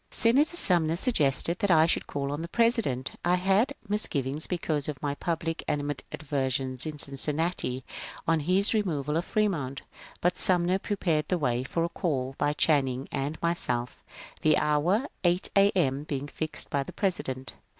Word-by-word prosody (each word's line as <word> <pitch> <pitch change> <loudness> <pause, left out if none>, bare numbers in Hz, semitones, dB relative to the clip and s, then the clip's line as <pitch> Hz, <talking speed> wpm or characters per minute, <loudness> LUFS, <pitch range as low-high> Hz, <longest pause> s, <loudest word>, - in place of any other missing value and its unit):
Senator 280 +9 +2
Sumner 170 - +1
suggested 170 - +2
that 205 - +1
I 160 -2 +6
should 165 - 0
call 140 -1 -3
on 145 +2 -3
the 170 - -4
Presi 230 +5 +3
dent. 130 - -3
I 175 +1 +3
had 195 +9 +2
misgivings 150 -8 0
because 155 -5 -1
of 145 -3 -5
my 145 -1 -2
public 165 +2 -3
animadversions 135 -2 -2
in 155 -1 -5
Cincinnati 145 -1 -1 0.4
on 165 0 +3
his 185 +8 +3
removal 155 -9 0
of 170 +2 0
Fremont, 165 -11 -1 0.4
but 180 +1 0
Sumner 180 +1 +2
pre 205 - -2
pared 155 -6 0
the 180 - +1
way 125 -5 0
for 165 +6 -1
a 170 - 0
caU 135 -7 -2
by 145 - +2
Channing 135 -4 +1
and 140 +3 -3
myself, 125 -8 -1 0.4
the 155 -1 +4
hour 150 +5 +2
of - - -6 0.2
8 175 +1 +2
A. 200 0 +6
M. 140 -3 +1
being 140 -1 -3
fixed 155 +1 -3
by 140 - +1
the 135 - -7
President. 135 -9 -2
155 Hz, 170 wpm, -28 LUFS, 140-180 Hz, 0.4 s, I